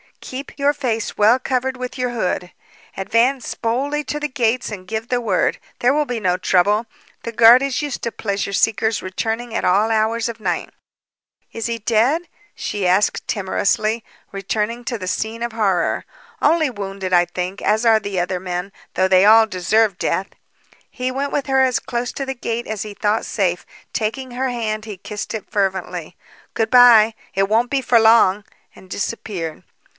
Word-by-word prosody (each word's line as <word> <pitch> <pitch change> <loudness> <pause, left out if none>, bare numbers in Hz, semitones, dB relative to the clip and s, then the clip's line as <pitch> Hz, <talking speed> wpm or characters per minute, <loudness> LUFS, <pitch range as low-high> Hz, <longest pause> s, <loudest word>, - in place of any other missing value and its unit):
Keep 265 +2 -8
your 285 0 +2
face 235 -6 -3
well 215 +4 +5
covered 260 0 -2
with 250 +1 -6
your 250 -1 -1
hood. 180 -6 -2 0.4
Advance 230 +6 +1
boldly 275 +6 -1
to 295 +3 -3
the 300 - -1
gates 250 -4 0
and 185 -3 -8
give 220 +2 -4
the 245 -1 0
word. 205 -6 0 0.2
There 245 +2 +3
will 300 0 +1
be 245 -4 -3
no 180 -3 +1
trouble. 200 +5 +2 0.4
The 230 - -4
guard 235 +2 +7
is 275 0 -1
used 290 -3 -4
to 235 - -1
pleasure 200 -2 -3
seekers 220 +1 +1
returning 225 +5 -3
at - - -1
all 205 +5 +3
hours 225 +1 +1
of 230 0 -7
night." 180 -5 -2 0.8
"Is 225 - -5
he 235 0 -2
dead?" 235 +9 +2 0.3
she 200 -3 -2
asked 190 +3 +2
timorously, 215 +2 0 0.3
returning 210 +4 -2
to 235 - -2
the 185 -3 -6
scene 220 +4 -2
of 235 - -2
horror. 195 -6 0 0.4
"Only 315 -1 +3
wounded, 195 -4 -5
I 175 0 +5
think, 180 +2 -5
as 220 +2 +1
are 225 -1 +5
the 200 -3 -3
other 180 +1 -1
men, 180 +1 -4 0.2
though 185 +1 +2
they 190 0 +5
all 220 +1 +7
deserve 210 0 +1
death." 195 - -1 0.6
He 255 0 -3
went 275 +2 -2
with 285 - -1
her 265 -1 +3
as 260 -2 +2
close 240 -1 -3
to 275 - -4
the 265 0 -4
gate 235 -1 -3
as 215 -2 -3
he 210 -1 -8
thought 210 +2 0
safe. 180 -4 -1 0.3
Taking 245 +4 -3
her 260 +2 -1
hand 215 -3 -3
he 210 -3 -7
kissed 205 +2 -6
it 215 - -7
fervently. 185 -4 -2 0.4
"Good 225 -1 0
bye! 235 -3 +7 0.2
It 195 +1 +1
won't 230 +3 +2
be 275 -1 +1
for 245 -2 +4
long!" 220 -3 +5 0.3
and 185 - -16
disappeared. 185 -6 -4
220 Hz, 180 wpm, -20 LUFS, 195-245 Hz, 0.8 s, guard